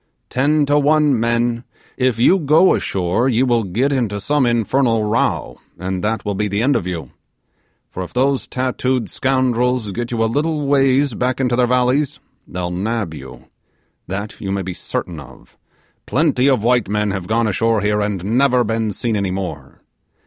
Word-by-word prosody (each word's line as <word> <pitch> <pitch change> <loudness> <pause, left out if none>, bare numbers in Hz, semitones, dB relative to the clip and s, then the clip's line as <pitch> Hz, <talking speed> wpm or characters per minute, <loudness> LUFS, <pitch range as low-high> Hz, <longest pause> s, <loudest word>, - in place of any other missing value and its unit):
Ten 145 +3 +2
to 145 +1 +3
one, 145 -3 +3
men, 120 +1 0 0.3
if 130 -2 +1
you 180 +11 +4
go 160 +4 +4
ashore, 95 +7 0
you 125 +1 +2
will 120 -3 +2
get 120 +10 0
into 115 -6 -1
some 140 +4 +1
infernal 120 0 +1
row, 105 - -1 0.2
and 90 0 -4
that 110 +1 -1
will 105 - -1
be 105 +2 -1
the 100 +2 -1
end 140 +2 +3
of 90 - -1
you; 85 -3 -5 0.8
for 95 - -7
if 90 -2 -6
those 135 +2 0
tattooed 130 -1 -1
scoundrels 125 -3 0
get 120 +4 -4
you 115 -2 0
a - - +3
little 150 +5 -1
ways 135 -1 +3
back 125 +4 -1
into 125 -2 +1
their 125 0 +2
valleys, 125 +3 +1 0.3
they'll 90 -1 -4
nab 100 0 -2
you 75 - -11 0.6
that 100 +3 -5
you 95 - -3
may 100 0 -1
be 95 0 -5
certain 85 -1 -5
of. 65 -3 -15 0.5
Plenty 140 -2 +2
of 130 -6 +1
white 120 -4 +2
men 105 0 0
have 95 -2 -4
gone 115 +1 +1
ashore 110 +1 +1
here 105 0 +1
and 100 -3 -2
never 125 +3 +3
been 110 -1 -1
seen 115 +1 -1
any 100 -2 -1
more. 80 -8 -6
115 Hz, 180 wpm, -19 LUFS, 100-130 Hz, 0.8 s, you